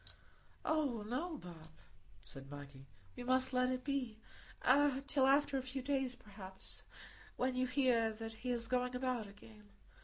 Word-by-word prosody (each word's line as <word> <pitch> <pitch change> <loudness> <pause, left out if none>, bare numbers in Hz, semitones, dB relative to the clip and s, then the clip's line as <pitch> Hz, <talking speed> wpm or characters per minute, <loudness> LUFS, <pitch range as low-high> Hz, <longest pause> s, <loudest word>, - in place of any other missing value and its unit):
"Oh 285 -8 +1
no, 310 +8 -2
Bob," 170 - -10 0.6
said 135 0 -10
Maggie, 140 -1 -9 0.3
"we 245 - -6
must 255 +1 +3
let 250 0 +3
it 255 0 -1
be,—till 270 +2 +1
after 280 0 +4
a - - -3
few 260 0 -4
days, 265 -2 0
perhaps, 200 -5 -8 0.6
when 255 +1 +1
you 255 0 +1
hear 250 -4 +3
that 225 +1 -6
he 250 - -2
is 240 -1 0
going 250 +1 0
about 250 -4 -1
again. 110 - -15
250 Hz, 145 wpm, -37 LUFS, 215-265 Hz, 0.6 s, after